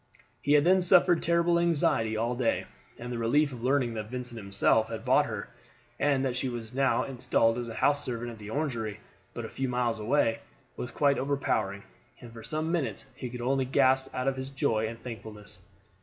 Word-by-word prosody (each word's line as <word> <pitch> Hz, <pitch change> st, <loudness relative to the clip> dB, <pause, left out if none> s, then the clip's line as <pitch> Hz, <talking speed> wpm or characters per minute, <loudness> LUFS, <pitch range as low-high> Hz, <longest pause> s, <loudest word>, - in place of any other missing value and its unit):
He 145 Hz, -, +2 dB
had 145 Hz, -1 st, +6 dB
then 185 Hz, +3 st, +5 dB
suffered 175 Hz, -1 st, +5 dB
terrible 170 Hz, 0 st, +2 dB
anxiety 145 Hz, -10 st, +2 dB
all 115 Hz, +2 st, 0 dB
day, 120 Hz, -1 st, 0 dB, 0.3 s
and 120 Hz, +1 st, -7 dB
the 120 Hz, -, -3 dB
relief 140 Hz, +6 st, +2 dB
of 120 Hz, -, -8 dB
learning 130 Hz, -2 st, +2 dB
that 110 Hz, -1 st, -5 dB
Vincent 125 Hz, -1 st, -6 dB
himself 110 Hz, +1 st, +2 dB
had 115 Hz, +1 st, -6 dB
bought 130 Hz, +3 st, +4 dB
her, 110 Hz, -3 st, -5 dB, 0.5 s
and 140 Hz, -2 st, +2 dB
that 125 Hz, -2 st, -1 dB
she 130 Hz, +1 st, -1 dB
was 120 Hz, -1 st, -6 dB
now 135 Hz, 0 st, +2 dB
installed 120 Hz, -3 st, +1 dB
as 120 Hz, -1 st, -4 dB
a 115 Hz, -, -7 dB
house 145 Hz, 0 st, +2 dB
servant 120 Hz, -1 st, -4 dB
at 115 Hz, -, -11 dB
the 105 Hz, 0 st, -9 dB
Orangery, 115 Hz, -6 st, -2 dB, 0.4 s
but 120 Hz, -, -4 dB
a -, -, -4 dB
few 135 Hz, +3 st, -3 dB
miles 120 Hz, -2 st, 0 dB
away, 115 Hz, 0 st, +1 dB, 0.4 s
was 125 Hz, -, -5 dB
quite 140 Hz, +3 st, +2 dB
overpowering, 130 Hz, -8 st, -1 dB, 0.4 s
and 120 Hz, -2 st, -12 dB
for 115 Hz, -, -9 dB
some 155 Hz, +6 st, -2 dB
minutes 170 Hz, -6 st, -2 dB
he 125 Hz, -, -6 dB
could 120 Hz, 0 st, -7 dB
only 135 Hz, +2 st, +1 dB
gasp 130 Hz, 0 st, +3 dB
out 130 Hz, +1 st, -1 dB
his 130 Hz, 0 st, -5 dB
joy 110 Hz, -5 st, 0 dB
and 115 Hz, +1 st, -6 dB
thankfulness. 105 Hz, -4 st, -8 dB
125 Hz, 200 wpm, -29 LUFS, 115-140 Hz, 0.5 s, had